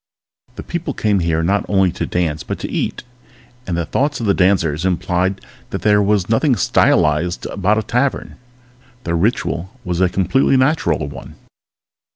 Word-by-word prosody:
People 170 -5 -4
came 105 -2 +1
here 80 -1 0
not 100 +4 +1
only 95 -2 +3
to - - -4
dance 80 -4 -1
but - - -5
to - - -6
eat, - - -2 0.6
and 85 -2 -2
the 85 - -1
thoughts 145 - -1
of 115 - -3
the 100 - +3
dancers 90 -5 +1
implied 95 +1 0 0.3
that - - -5
there 105 -1 +4
was 100 -2 +1
nothing 125 +4 +2
stylized 85 -3 +2
about 100 +2 0
a 110 - 0
tavern. 125 +5 -1 0.7
The 85 - -2
ritual 90 -1 -1 0.2
was 90 0 -1
a 90 - +4
completely 130 +9 +2
natural 145 +5 +1
one. - - -10
95 Hz, 160 wpm, -18 LUFS, 85-110 Hz, 0.7 s, there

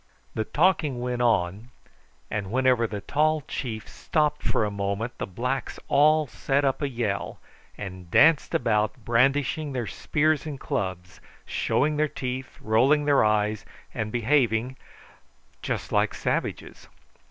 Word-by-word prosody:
The 110 - -2
talking 155 - +1
went 125 0 -2
on, 110 -1 +1 0.6
and 105 -3 -3
whenever 125 -2 +3
the 105 -1 -5
tall 155 +7 +1
chief 115 -6 -5
stopped 150 -2 -1
for - - +1
a 105 - -2
moment 100 +4 -3
the - - -3
blacks 125 +7 -3
all 155 +2 +4
set 140 +1 -1
up 135 +1 0
a 145 - 0
yell, 115 -6 -3 0.4
and 95 -3 -8
danced 160 - +4
about 110 0 0
brandishing 140 +5 +1
their 125 -3 -2
spears 155 +7 0
and 145 -3 -6
clubs, 95 -6 -4 0.2
showing 150 +1 0
their 155 +1 +2
teeth, 130 -1 -5
rolling 130 +7 +3
their 145 -4 +4
eyes, 105 0 +1 0.3
and 110 -1 -3
behaving 120 0 +1 0.9
just - - -3
like - - +1
savages. - - -3
125 Hz, 135 wpm, -26 LUFS, 110-145 Hz, 0.9 s, all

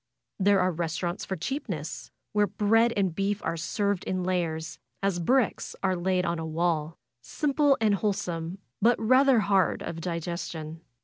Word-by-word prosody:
There 200 0 +4
are 185 0 +2
res 165 0 -2
taurants 175 +1 -3
for 190 - -2
cheapness, 185 - -4 0.2
where 210 -1 +3
bread 225 +4 +3
and 190 -4 +1
beef 200 +3 -1
are 165 - 0
served 200 +3 -1
in 185 -1 -1
layers, 165 -3 -2 0.2
as 195 -3 +1
bricks 245 +6 +1
are 190 -1 +2
laid 180 +1 0
on 170 -1 -1
a - - -3
wall; 160 -1 -1 0.2
simple 285 - +2
and 215 -2 +3
whole 205 +1 +1
some, 175 -3 -4 0.2
but 235 +3 +4
rather 255 +1 +5
hard 195 -3 +2
of 165 0 -5
digestion. 165 -2 -4
185 Hz, 165 wpm, -27 LUFS, 165-205 Hz, 0.2 s, rather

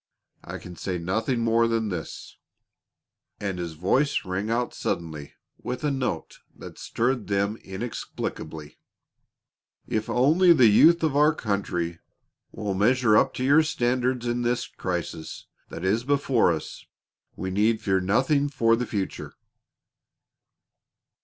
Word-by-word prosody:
I - - -7
can 90 - -10
say 90 +1 -3
nothing 110 +8 -1
more 115 0 +3
than 115 -2 0
this," 85 -4 -7 1.0
and 95 -3 -3
his 85 -2 -4
voice 105 - +1
rang 95 +3 -3
out 120 +1 -1
suddenly 80 -4 -4 0.3
with 125 +4 -5
a 150 - +1
note 125 -11 -3 0.2
that - - -11
stirred 120 -1 -1
them 100 +2 0
inexplicably: 95 -7 -6 1.1
"If 110 0 -2
only 165 +8 +5
the 130 -7 +5
youth 165 +11 +6
of 155 -3 +1
our 150 +1 +4
country 90 - -2 0.5
will 105 -2 -3
measure 110 +3 +3
up - - +3
to 125 - -3
your 145 +4 +5
standards 125 -4 0
in 120 0 -1
the 120 0 -1
crisis 85 -3 -5 0.2
that 85 - -6
is 110 +5 +1
before 135 -6 +2
us, 80 -2 -5 0.5
we 95 - -4
need 110 +3 +2
fear 95 -3 +1
nothing 135 +9 +2
for 115 -4 +3
the 120 +1 -3
future." 100 -3 -4
115 Hz, 135 wpm, -25 LUFS, 95-130 Hz, 1.1 s, youth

